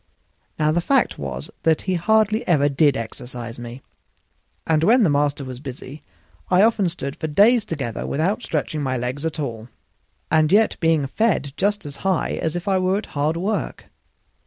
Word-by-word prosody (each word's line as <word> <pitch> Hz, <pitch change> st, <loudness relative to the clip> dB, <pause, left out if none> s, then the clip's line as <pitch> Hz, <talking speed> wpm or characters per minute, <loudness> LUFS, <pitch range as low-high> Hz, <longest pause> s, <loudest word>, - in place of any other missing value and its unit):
Now 155 Hz, 0 st, +2 dB
the 175 Hz, +2 st, +1 dB
fact 270 Hz, +8 st, +1 dB
was 70 Hz, -1 st, -6 dB
that 160 Hz, -1 st, +2 dB
he 185 Hz, -, -1 dB
hardly 215 Hz, +4 st, +2 dB
ever 145 Hz, -5 st, +3 dB
did 145 Hz, 0 st, +3 dB
exercise 120 Hz, +1 st, -7 dB
me, 120 Hz, +2 st, -9 dB, 0.8 s
and 160 Hz, -1 st, +2 dB
when 230 Hz, +6 st, +5 dB
the 170 Hz, -, +3 dB
master 145 Hz, -1 st, 0 dB
was 130 Hz, -1 st, -7 dB
busy 135 Hz, +1 st, -9 dB, 0.5 s
I 185 Hz, +2 st, +5 dB
often 215 Hz, -5 st, +3 dB
stood 140 Hz, -5 st, -5 dB
for 160 Hz, -, -3 dB
days 210 Hz, +8 st, +4 dB
together 135 Hz, -, -4 dB
without 180 Hz, -, 0 dB
stretching 155 Hz, -5 st, -2 dB
my 130 Hz, -2 st, -1 dB
legs 130 Hz, +6 st, -3 dB
at 160 Hz, -, -6 dB
all, 115 Hz, -6 st, -4 dB, 0.6 s
and 155 Hz, -1 st, +3 dB
yet 215 Hz, +3 st, +4 dB
being 165 Hz, -3 st, +2 dB
fed 145 Hz, -3 st, 0 dB
just 205 Hz, -1 st, 0 dB
as 145 Hz, -1 st, -7 dB
high 190 Hz, -3 st, 0 dB
as 160 Hz, +1 st, -2 dB
if 175 Hz, +2 st, -5 dB
I 190 Hz, -1 st, +2 dB
were 185 Hz, +1 st, +1 dB
at 210 Hz, -, -4 dB
hard 150 Hz, +3 st, 0 dB
work. 200 Hz, +5 st, -3 dB
155 Hz, 180 wpm, -22 LUFS, 140-190 Hz, 0.8 s, when